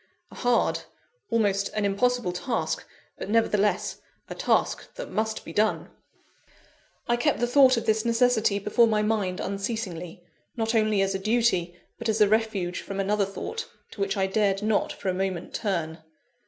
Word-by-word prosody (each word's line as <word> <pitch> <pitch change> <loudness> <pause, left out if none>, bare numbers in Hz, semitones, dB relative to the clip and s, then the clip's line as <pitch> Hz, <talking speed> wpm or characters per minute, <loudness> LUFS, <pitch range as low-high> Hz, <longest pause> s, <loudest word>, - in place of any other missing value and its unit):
A - - -12
hard, 245 -1 +2 0.5
almost 200 -3 +1
an 210 -1 0
impossible 235 +1 +1
task 180 +6 -2 0.3
but, - - -5
nevertheless, 210 -2 +1 0.3
a - - -4
task - - 0
that - - -7
must 220 0 -2
be 165 - -8
done! 215 +3 +1 1.2
I 240 - +3
kept 240 - +1
the 240 - +2
thought 255 0 +5
of 230 - -2
this 220 0 +2
necessity 230 -3 +2
before 210 +4 +3
my 215 -1 +1
mind 205 -4 0
unceasingly; 190 -4 -4 0.3
not 225 0 0
only 215 -3 +3
as 195 0 0
a 195 - -2
duty, 190 -5 +1 0.2
but 230 - -2
as 220 0 +1
a 210 - +6
refuge 210 -5 0
from 195 0 -6
another 200 +1 +1
thought, 325 - -6 0.2
to 200 - -8
which 195 +1 0
I 190 - +2
dared 195 0 +1
not 215 -1 +1
for - - -7
a - - +1
moment 185 -2 -3
turn. 170 -6 -2
210 Hz, 170 wpm, -26 LUFS, 195-230 Hz, 1.2 s, a